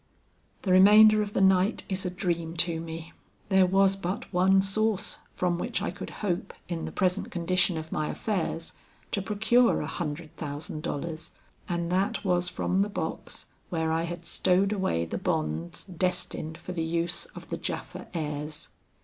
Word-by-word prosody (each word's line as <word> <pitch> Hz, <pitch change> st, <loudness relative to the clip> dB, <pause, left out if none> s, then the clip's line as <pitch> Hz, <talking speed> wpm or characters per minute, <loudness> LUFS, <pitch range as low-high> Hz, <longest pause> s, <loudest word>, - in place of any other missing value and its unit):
"The 190 Hz, -, 0 dB
remainder 210 Hz, +3 st, +8 dB
of 205 Hz, -1 st, -3 dB
the -, -, +1 dB
night 190 Hz, +2 st, +4 dB
is 190 Hz, -1 st, -2 dB
a -, -, 0 dB
dream 170 Hz, -2 st, -2 dB
to 170 Hz, -1 st, +2 dB
me. 165 Hz, 0 st, -7 dB, 0.4 s
There 190 Hz, -2 st, +5 dB
was 195 Hz, +1 st, +4 dB
but 195 Hz, +1 st, -4 dB
one 190 Hz, +2 st, +5 dB
source 210 Hz, 0 st, 0 dB, 0.2 s
from 175 Hz, -1 st, 0 dB
which -, -, -1 dB
I -, -, -2 dB
could -, -, -7 dB, 0.2 s
hope 175 Hz, -3 st, -2 dB
in 170 Hz, -2 st, -3 dB
the -, -, -5 dB
present 185 Hz, 0 st, 0 dB
condition 180 Hz, 0 st, +1 dB
of 160 Hz, 0 st, -6 dB
my 155 Hz, 0 st, -1 dB
affairs, 175 Hz, -5 st, -2 dB, 0.4 s
to 200 Hz, -, 0 dB
procure 220 Hz, +4 st, +3 dB
a -, -, -2 dB
hundred 155 Hz, 0 st, -5 dB
thousand 150 Hz, +1 st, -5 dB
dollars; 155 Hz, +2 st, -5 dB, 0.4 s
and 170 Hz, -1 st, -1 dB
that 195 Hz, +2 st, 0 dB
was 180 Hz, -1 st, +2 dB
from 180 Hz, +1 st, 0 dB
the 205 Hz, -, +1 dB
box 200 Hz, -, -5 dB, 0.2 s
where 160 Hz, -2 st, 0 dB
I 165 Hz, +1 st, +1 dB
had 175 Hz, 0 st, -6 dB
stowed 195 Hz, +3 st, +2 dB
away 185 Hz, -, 0 dB
the 80 Hz, -, -4 dB
bonds 80 Hz, +2 st, -2 dB
destined 175 Hz, -3 st, -2 dB
for 180 Hz, -, -8 dB
the 175 Hz, -2 st, -2 dB
use 170 Hz, -, -1 dB
of -, -, -10 dB
the -, -, -1 dB
Japha -, -, -5 dB
heirs. 150 Hz, -2 st, -4 dB
180 Hz, 170 wpm, -28 LUFS, 165-195 Hz, 0.4 s, remainder